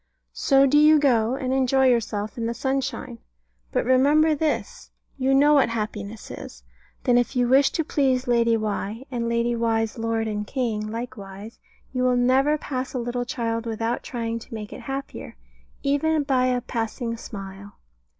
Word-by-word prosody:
So 275 -1 +4
do 290 +2 +4
you 305 +1 +7
go, 245 -4 +2
and 260 -1 -2
enjoy 265 0 +3
yourself 220 -4 0
in 230 -1 -2
the 235 - -3
sunshine; 265 - -3 0.5
but - - 0
remember 290 +5 +4
this 305 0 -2 0.3
You 270 0 +1
know 290 +2 +5
what 275 -5 +4
happiness 215 -1 -5
is. - - -9 0.4
Then 245 -2 +4
if 245 +2 -2
you 245 -1 +2
wish 270 +3 +5
to 325 - 0
please 265 -4 +1
Lady 235 -1 +3
Why, 215 +2 -3
and 235 -2 -2
Lady 235 +1 +1
Why's 225 -1 0
Lord 225 0 -1
and 210 -1 -3
King 220 -5 -2
likewise, 220 -3 -8 0.3
you 255 - -1
will 250 0 +3
never 265 +5 +3
pass 260 -3 -4
a - - 0
little 245 0 -2
child 230 -2 -3
without 225 +1 -2
trying 230 -2 -4
to - - -15
make 210 -1 -7
it - - -9
happier, 275 0 -6 0.5
even 295 +2 +1
by 260 -2 +2
a 250 -1 +1
passing 230 0 -3
smile. 200 -3 -9
245 Hz, 170 wpm, -24 LUFS, 225-270 Hz, 0.5 s, you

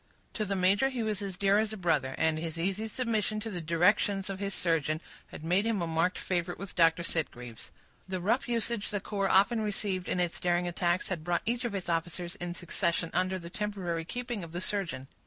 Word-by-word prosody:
To 215 - -1
the 200 0 -1
major 195 +8 +4
he 250 -4 -2
was 215 -2 -1
as 195 -2 -4
dear 200 +1 +4
as 220 -1 0
a 215 - -5
brother, 150 -8 +1
and 160 -1 +2
his 165 0 -4
easy 195 +6 0
submission 220 -2 0
to 225 - -4
the 180 -3 -3
directions 195 +4 +2
of 190 - -5
his 200 -1 -2
surgeon 160 -2 +1 0.3
had - - -10
made 180 +5 +3
him 225 -2 +1
a 170 - 0
marked 165 +2 +1
favorite 175 -1 -1
with 195 0 -7
Dr. 165 0 +4
Sitgreaves. 125 -9 -3 0.4
The 185 -1 -2
rough 230 +8 +1
usage 235 -2 0
the 205 - -1
corps 195 -1 -1
often 220 +4 +5
received 200 -3 -1
in 180 - 0
its 175 -1 0
daring 175 0 +1
attacks 175 +1 0
had 175 -5 -3
brought 175 +1 0
each 240 +2 0
of 225 -4 -2
its 190 -2 -3
officers, 170 +1 -2
in 175 -1 -4
succession, 170 -1 0
under 185 +1 +1
the 170 -1 -8
temporary 190 -5 -2
keeping 240 +2 -4
of 165 -1 -9
the 175 - -2
surgeon. 170 -10 -2
185 Hz, 215 wpm, -30 LUFS, 170-210 Hz, 0.4 s, often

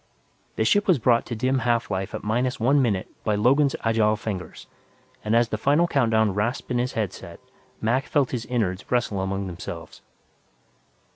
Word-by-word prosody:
The 110 - 0
ship 205 - +3
was 180 -5 +5
brought 120 -1 +2
to 120 - -4
dim 130 +4 +1
half 120 -2 0
life 95 0 -3
at - - -6
minus 125 +4 -1
one 135 +5 +3
minute 105 -7 0 0.2
by 105 -2 +1
Logan's 135 +6 +3
agile 110 -1 +2
fingers, 105 -4 -6 0.6
and 110 +1 +1
as 120 0 +3
the 110 - -3
final 145 +8 +3
countdown 110 - +2
rasped 115 +6 -2
in 125 - +1
his 125 +2 -1
headset, 105 -5 -5 0.4
Mac 125 +5 +1
felt 140 -4 +1
his 120 -3 -3
innards 100 -7 -2
wrestle 110 -5 0
among 95 +1 -2
themselves. 85 -2 -8
115 Hz, 170 wpm, -24 LUFS, 105-130 Hz, 0.6 s, was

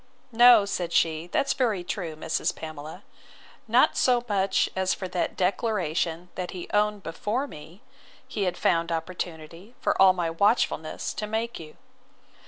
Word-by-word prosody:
No, 235 -2 +7
said 175 -4 -3
she, 160 0 +1
that's 275 +9 0
very 220 -8 0
true, 175 -3 -4
Mrs. 160 +1 -2
Pamela; 155 +4 -8 0.6
not - - +4
so 245 -2 +2
much 195 -2 +1
as 190 0 +1
for 185 - -5
that 180 -1 -2
declaration 180 -3 -1
that 180 -1 -5
he 175 - -7
owned 210 -1 +1
before 210 +10 -2
me, 165 - -12 0.4
he 205 -3 -2
had 180 -1 -2
found 170 0 +1
opportunity, 165 +4 -6
for - - 0
all 190 -1 +8
my 175 -3 -2
watchfulness, 165 -4 0
to 210 - -4
make 225 +2 -3
you. 155 -2 -12
185 Hz, 150 wpm, -26 LUFS, 165-210 Hz, 0.6 s, all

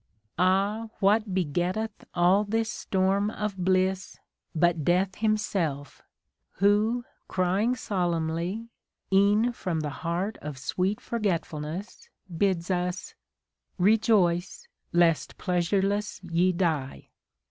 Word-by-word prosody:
Ah! 200 +5 +2
what 210 +1 +3
begetteth 185 +5 -2
all 180 +4 +4
this 220 +1 -1
storm 195 +2 0
of 210 -2 -3
bliss, 185 +1 0 0.4
But 170 -1 +2
Death 180 +4 +2
himself, 195 - -1 0.5
who 210 +5 +2 0.2
crying 190 +7 +1
solemnly. 175 +1 -2 0.4
E'en 205 +5 +4
from 180 -8 -3
the 150 -1 -3
heart 180 +5 -2
of 150 -2 -6
sweet 185 +9 -1
Forgetfulness, 175 -4 -3 0.3
Bids 185 0 0
us, 180 0 -2 0.6
Rejoice, 195 -3 +2 0.2
lest 170 -2 +2
pleasureless 195 +3 0
ye 175 +1 +2
die. 155 - -2
185 Hz, 95 wpm, -27 LUFS, 175-210 Hz, 0.6 s, all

